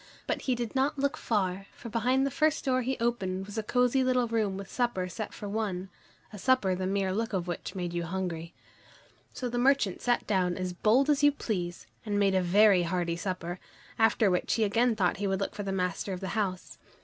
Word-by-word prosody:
But - - -2
he 255 - 0
did 235 -2 -4
not 270 +2 +1
look 280 +2 0
far, 195 -7 -1
for - - -9
behind 250 +4 +2
the 275 - -1
first 310 +2 +1
door 255 -1 +2
he 260 +2 -2
opened 195 -5 -1
was 205 +2 -5
a - - 0
cosy 250 +4 +2
little 255 -1 +2
room 215 -4 0
with 195 -1 -7
supper 235 -7 -1
set 210 +4 -5
for 205 - -7
one, 200 -3 -2 0.4
a 210 - -8
supper 230 -4 +3
the 185 0 -2
mere 195 -1 0
look 225 +3 -2
of 180 -2 -1
which 175 +3 -5
made 175 -2 -3
you 175 - -1
hungry. 170 -2 -4 0.8
So 250 - -4
the 240 0 -2
merchant 255 -7 +2
sat 245 -1 +1
down 185 -4 +1
as 185 -1 -3
bold 225 +9 +3
as 290 0 +2
you 290 0 +6
please, 180 -10 -4 0.2
and 205 -3 -1
made 200 -1 +3
a 190 - +3
very 195 +1 +5
hearty 170 -1 -1
supper, 180 0 -4 0.4
after 225 -2 +4
which 180 - +1
he 225 - +2
again 225 +3 +2
thought 185 -4 +1
he 200 +1 -1
would 190 -1 0
look 195 - -2
for 210 - -5
the 195 -1 -3
master 185 +1 -2
of 180 - -4
the 190 -1 -4
house. 190 -4 -3
205 Hz, 220 wpm, -29 LUFS, 185-240 Hz, 0.8 s, you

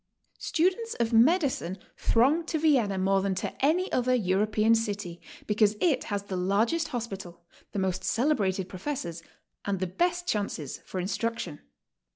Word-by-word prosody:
Students 375 +8 0
of 235 0 -1
medicine 245 - +3 0.2
throng 275 +9 +3
to 320 - 0
Vienna 260 -11 +2
more 195 +1 +2
than 195 -1 0
to - - -3
any 350 +7 +2
other 255 0 +2
European 215 +1 +2
city, 205 -6 -2 0.2
because 210 0 +3
it 290 -8 +2
has 200 -1 -2
the 200 -2 -5
largest 210 - +1
hospital, 195 - -6 0.3
the - - -5
most 185 -1 -1
celebrated 200 -8 +1
professor's, 180 - -5 0.4
and 200 -2 -1
the 185 - 0
best 350 - 0
chances 200 - -2
for 185 - -4
instruc 230 +5 -1
tion. 145 - -6
215 Hz, 150 wpm, -28 LUFS, 190-280 Hz, 0.4 s, medicine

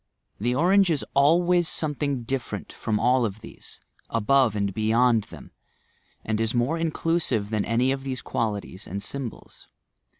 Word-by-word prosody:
The 120 +4 0
orange 185 +5 +4
is 155 -4 0
always 170 +4 +3
something 145 -5 -1
different 130 +1 -4
from 105 -1 -2
all 125 +2 +3
of 110 -1 -3
these, - - -11 0.3
above 115 0 +2
and 100 -1 -1
beyond 110 +1 +2
them, - - -13 0.7
and 110 0 -1
is 115 +2 0
more 130 +8 +1
inclusive 160 -9 0
than 105 -2 0
any 120 +4 +1
of 135 0 -3
these 130 -2 -4
qualities 105 -5 -3
and 100 +3 -5
symbols. 130 +1 -7
125 Hz, 145 wpm, -25 LUFS, 110-145 Hz, 0.7 s, orange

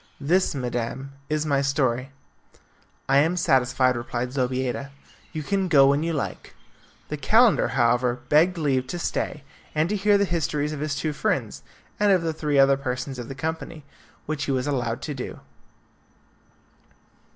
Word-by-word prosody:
This, 170 +4 +1
madam, 125 +1 -3 0.2
is 155 0 0
my 140 -2 +2
story. 135 -2 0 1.0
"I 135 - +4
am 165 +5 +2
satisfied," 130 -3 +2
replied 120 +1 -3
Zobeida; 130 +1 -1 0.4
"you 155 -2 -4
can 195 +4 0
go 140 -6 +6
when 140 +1 +2
you 165 +1 -1
like." 150 -4 -4 0.5
The 150 - -3
calender, 220 - +4
however, 120 -1 +2
begged 170 +5 +4
leave 135 -5 0
to 175 - -4
stay 150 -3 -3 0.3
and 155 +2 +2
to 210 - 0
hear 205 +1 +3
the 200 - +2
histories 155 -3 -1
of 150 - -5
his 150 -1 -2
two 155 +1 -2
friends - - -2 0.4
and 205 -1 +4
of 185 -3 +3
the 165 -1 -1
three 150 -2 -1
other 135 0 +5
persons 130 0 -4
of 120 - -6
the 135 - -7
company, 160 +1 -5 0.4
which 150 -2 -3
he - - -1
was 130 -1 0
allowed 125 -4 -2
to 150 - -3
do. 130 -2 -6
140 Hz, 160 wpm, -24 LUFS, 130-160 Hz, 1.0 s, go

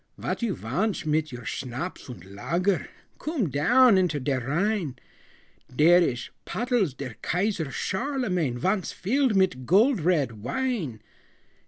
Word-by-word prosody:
"Vot - - -3
you 225 -5 0
vantsh 180 - -2
mit 155 0 0
your 125 -1 -8
schnapps 130 +8 -5
und 95 -8 -9
lager? 170 - -1 0.3
Coom 280 - -2
down 225 - +5
into 170 -5 +1
der 135 0 0
Rhine! 175 - 0 0.8
Der 160 +7 +6
ish 120 -8 -1
pottles 230 - 0
der 135 -4 -6
Kaiser 180 -4 -1
Charlemagne 190 - -1
Vonce 190 - 0
filled 250 +3 +1
mit 155 -10 +1
gold 220 - +4
red 145 - +1
wine!" 195 - -2
175 Hz, 130 wpm, -26 LUFS, 135-215 Hz, 0.8 s, Der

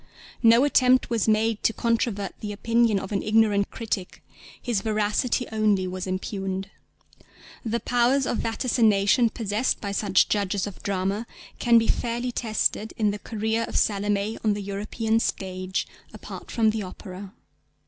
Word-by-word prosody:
No 230 +2 +6
attempt 255 -3 +3
was 230 -2 +1
made 220 0 +2
to 225 - +2
controvert 230 -4 -1
the 210 - -5
opinion 230 +1 +2
of 190 - -7
an 200 - 0
ignorant 210 -2 +2
critic: 210 -5 -5 0.4
his 235 -5 -1
veracity 215 +4 0
only 210 -3 +2
was 185 +1 -5
impugned. 190 +1 -4 0.9
The 235 0 -1
powers 245 +3 +2
of 240 - -1
vaticination 225 -1 +2
possessed 220 +2 -1
by 200 - -4
such 200 -2 +2
judges 200 -2 0
of 205 -3 -8
drama 200 +3 -2 0.3
can 235 -1 +5
be 225 -1 +3
fairly 240 +1 -1
tested 220 -2 -1
in 210 -2 +2
the 205 - -5
career 220 +1 -2
of - - -8
Salomé 205 +1 0
on 210 -2 +2
the 205 - -5
European 215 +3 -1
stage, 185 -3 -3 0.3
apart - - -9
from 220 -2 +2
the 220 0 -3
opera. 190 0 -9
215 Hz, 150 wpm, -25 LUFS, 200-230 Hz, 0.9 s, No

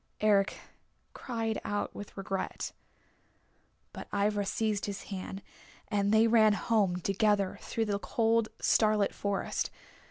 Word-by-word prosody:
Eric 205 -2 +3 0.6
cried 225 -3 -3
out 205 0 -2
with 205 - -9
regret. 195 0 -3 1.2
But - - -8
Ivra 205 0 +1
seized 210 0 -1
his 200 -1 -5
hand, 190 +1 -6 0.5
and 205 -1 +1
they 220 +1 +5
ran 220 -2 +5
home 205 -4 +1
together 195 +1 +1
through 225 - -2
the 200 -1 -1
cold, 225 +1 +1
starlit 215 -2 +3
forest. 200 -1 -2
205 Hz, 120 wpm, -30 LUFS, 200-220 Hz, 1.2 s, they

